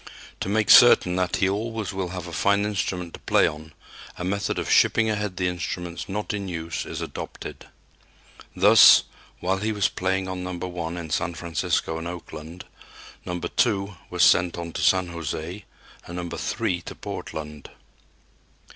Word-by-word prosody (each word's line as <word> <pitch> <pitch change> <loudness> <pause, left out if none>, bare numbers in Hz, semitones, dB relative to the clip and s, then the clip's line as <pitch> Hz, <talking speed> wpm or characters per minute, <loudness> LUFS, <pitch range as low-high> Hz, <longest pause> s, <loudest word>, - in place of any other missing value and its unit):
To - - -3
make 105 +1 +2
certain 90 -7 +7
that 90 -1 0
he 95 - +2
always 110 +1 -3
will 95 -1 -2
have 90 0 -6
a 85 - -9
fine 100 +7 +2
instrument 90 -4 -3
to - - -9
play - - +3
on, 80 +1 -4 0.5
a - - -5
method 100 +2 -1
of - - -2
shipping 110 -1 +4
ahead 105 -3 -3
the 90 - 0
instruments 90 0 -4
not 105 +2 -3
in 100 -2 -4
use 85 -2 -4
is - - -5
adopted. - - -7 0.9
Thus, 100 +1 +8 0.4
while 95 +2 0
he 110 +2 -1
was 105 -2 +1
playing 95 +1 -1
on 95 -1 -4
No. 90 0 -4
1 90 -1 -5
in 80 -3 -7
San 85 +2 -1
Francisco 80 -1 -1
and 85 - -5
Oakland, 85 -1 -8 0.6
No. 90 - -3
2 100 +1 0
was - - +1
sent 90 -1 +4
on 85 -1 -5
to - - -4
San 95 -1 +3
José 85 +3 -5 0.4
and 85 - -7
No. 85 -1 -5
3 105 0 -2
to - - -9
Portland. 75 -2 -7
90 Hz, 165 wpm, -24 LUFS, 85-100 Hz, 0.9 s, Thus